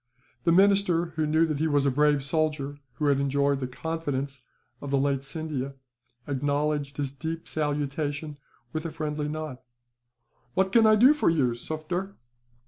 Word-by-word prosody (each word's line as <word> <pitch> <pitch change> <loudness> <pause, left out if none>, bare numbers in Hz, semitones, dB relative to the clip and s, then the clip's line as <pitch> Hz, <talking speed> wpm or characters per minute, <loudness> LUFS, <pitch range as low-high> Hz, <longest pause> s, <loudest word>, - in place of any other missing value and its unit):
The 170 - +5
minister, 180 -3 +3
who 155 -1 0
knew 160 +2 +3
that 155 -3 -2
he 160 - +2
was 145 -2 +2
a 140 - +3
brave 145 +1 +3
soldier, 145 -1 -1
who 150 +5 -2
had 140 -1 +3
enjoyed 140 0 +1
the 130 - -2
confidence 140 -1 -3 0.4
of 145 - -6
the 140 - +2
late 135 0 +1
Scindia, 140 -2 -4 0.5
acknowledged 145 +1 -1
his 140 -2 -2
deep 160 +4 -5
salutation 145 0 -2 0.4
with 155 - -2
a 165 - -3
friendly 150 -1 -3
nod. 155 -4 -5 1.0
"What 190 +1 +2
can 225 0 +6
I 215 - +7
do 250 +7 +7
for 300 - +2
you, 140 -7 +2
Sufder?" 165 +9 -4
150 Hz, 160 wpm, -27 LUFS, 140-160 Hz, 1.0 s, I